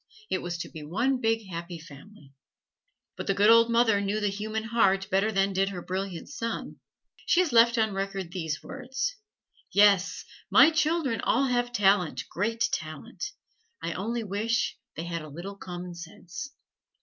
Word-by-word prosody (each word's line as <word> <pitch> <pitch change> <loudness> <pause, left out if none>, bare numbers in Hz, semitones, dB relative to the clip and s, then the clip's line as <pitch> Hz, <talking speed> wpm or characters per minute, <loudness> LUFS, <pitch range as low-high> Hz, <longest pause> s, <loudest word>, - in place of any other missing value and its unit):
It - - 0
was 175 -1 -4
to 170 - -5
be 160 - -9
one 240 - 0
big 225 -1 +1
happy 170 -1 -6
family. 150 0 -14 0.8
But - - -5
the 195 - +2
good 205 +3 +6
old 230 0 +6
mother 230 -3 +4
knew 200 +2 -1
the 205 -1 +1
human 215 +2 -3
heart 195 -4 +2
better 195 +3 +2
than 195 -1 +1
did 195 +1 +1
her 180 -3 -6
brilliant 185 -2 -4
son. 230 -5 -5 0.5
She 345 - +4
has 330 -8 -1
left 235 +1 +6
on 220 -2 +2
record 195 -2 -3
these 160 -5 -3
words: 270 - -3 0.6
"Yes, 200 -2 +4 0.2
my 325 - +7
children 315 -7 +1
all 270 +4 +2
have 245 -1 0
talent, 190 - +2
great 225 +6 0
talent; 160 - -5 0.6
I 165 0 -2
only 230 +5 -2
wish 215 +4 -1 0.2
they 165 - -4
had 170 -1 -4
a 155 - -9
little 175 +7 -7
commonsense!" 180 - -8
200 Hz, 160 wpm, -28 LUFS, 175-230 Hz, 0.8 s, my